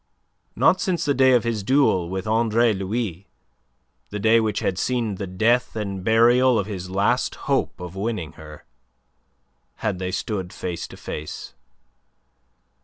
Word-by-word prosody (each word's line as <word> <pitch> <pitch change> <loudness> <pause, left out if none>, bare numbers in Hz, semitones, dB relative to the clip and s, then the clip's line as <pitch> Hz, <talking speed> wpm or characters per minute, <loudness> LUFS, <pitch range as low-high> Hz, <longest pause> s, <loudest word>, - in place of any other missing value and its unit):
Not 185 - +3
since 180 -3 0
the 145 - +2
day 130 -1 +5
of 120 - +4
his 115 -3 -1
duel 100 -7 +2
with 95 0 -4
Andre 115 +1 +2
Louis 100 -1 -3 0.8
the 105 - -5
day 110 +3 +4
which 110 -2 0
had 90 -1 -1
seen 120 -4 0
the 100 0 -4
death 115 +8 +1
and 100 -3 -4
burial 120 +3 +4
of 100 - 0
his 95 -3 -6
last 105 +7 +1
hope 140 -7 0
of 90 0 -8
winning 95 -6 -3
her 75 -1 -13 1.1
had 105 -4 -2
they 90 -1 -2
stood 95 -2 -3
face 90 -2 -5
to - - -12
face. 75 -4 -7
105 Hz, 150 wpm, -23 LUFS, 95-120 Hz, 1.1 s, day